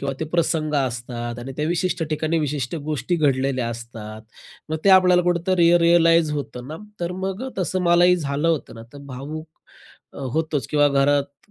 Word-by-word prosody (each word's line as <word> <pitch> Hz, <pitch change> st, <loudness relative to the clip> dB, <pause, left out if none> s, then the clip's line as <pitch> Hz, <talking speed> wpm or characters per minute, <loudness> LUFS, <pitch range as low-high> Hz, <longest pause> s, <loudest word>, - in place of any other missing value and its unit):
किंवा 140 Hz, 0 st, -2 dB
ते -, -, 0 dB
प्रसंग 160 Hz, -2 st, 0 dB
असतात. 120 Hz, -3 st, -3 dB
आणि 130 Hz, +3 st, -7 dB
त्या 150 Hz, +1 st, -1 dB
विशिष्ट 175 Hz, 0 st, -1 dB
ठिकाणी 155 Hz, +2 st, 0 dB
विशिष्ट 145 Hz, -1 st, -2 dB, 0.2 s
गोष्टी 170 Hz, +4 st, -1 dB
घडलेल्या 135 Hz, -4 st, +1 dB
असतात. 110 Hz, -2 st, -8 dB, 0.5 s
मग 160 Hz, -, -1 dB
ते 195 Hz, -, +6 dB
आपल्याला 180 Hz, -1 st, +3 dB
कुठेतरी 175 Hz, 0 st, +3 dB
रियलाइज 165 Hz, -1 st, +4 dB
होतं 125 Hz, -3 st, -5 dB
ना. 155 Hz, -, -6 dB, 0.2 s
तर 175 Hz, +1 st, -2 dB
मग 195 Hz, +4 st, -3 dB
अ, -, -, -4 dB
तसं 185 Hz, 0 st, -1 dB
मलाही 175 Hz, +1 st, +5 dB
झालं 145 Hz, 0 st, -1 dB
होतं 160 Hz, -7 st, -1 dB
ना. 115 Hz, -, -10 dB
तर 145 Hz, -, -11 dB
भावुक 150 Hz, +5 st, -7 dB, 0.6 s
अ, -, -, -11 dB
होतोच. 155 Hz, -5 st, -1 dB
किंवा 145 Hz, -1 st, +4 dB
घरात 140 Hz, 0 st, 0 dB
150 Hz, 170 wpm, -22 LUFS, 135-170 Hz, 0.6 s, ते